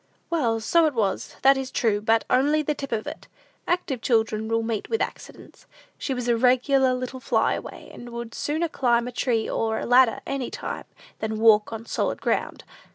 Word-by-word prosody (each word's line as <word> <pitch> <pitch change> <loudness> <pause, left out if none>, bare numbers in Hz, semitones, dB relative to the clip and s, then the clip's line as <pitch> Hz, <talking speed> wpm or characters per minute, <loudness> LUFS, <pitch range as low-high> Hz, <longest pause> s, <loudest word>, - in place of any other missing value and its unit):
"Well, 240 -9 +1
so 325 +8 +3
it 295 - -3
was, 205 -4 -1
that 270 +1 +6
is 265 -1 -4
true; 210 -5 0
but 225 +1 +2
only 290 +4 +2
the 300 - 0
tip 275 -1 -7
of 220 -2 -1
it. 300 +2 -8 0.4
Active 320 -9 -1
children 220 -2 +1
will 225 0 0
meet 225 -2 -3
with 450 - 0
accidents. - - -7 0.3
She 270 - -2
was 245 -1 -4
a 240 - +3
regular 255 +2 +3
little 255 +1 -5
fly - - +1
away, - - -8
and 240 - -10
would 235 -1 -7
sooner 315 +3 -1
climb 240 -5 +1
a - - -5
tree 235 -2 0
or 220 -1 -1
a - - -3
ladder 245 -1 +5
any 275 -2 -3
time, - - -6 0.3
than 220 0 -3
walk 215 -1 +4
on 225 0 -6
solid - - -2
ground. - - -2
245 Hz, 195 wpm, -24 LUFS, 225-270 Hz, 0.4 s, that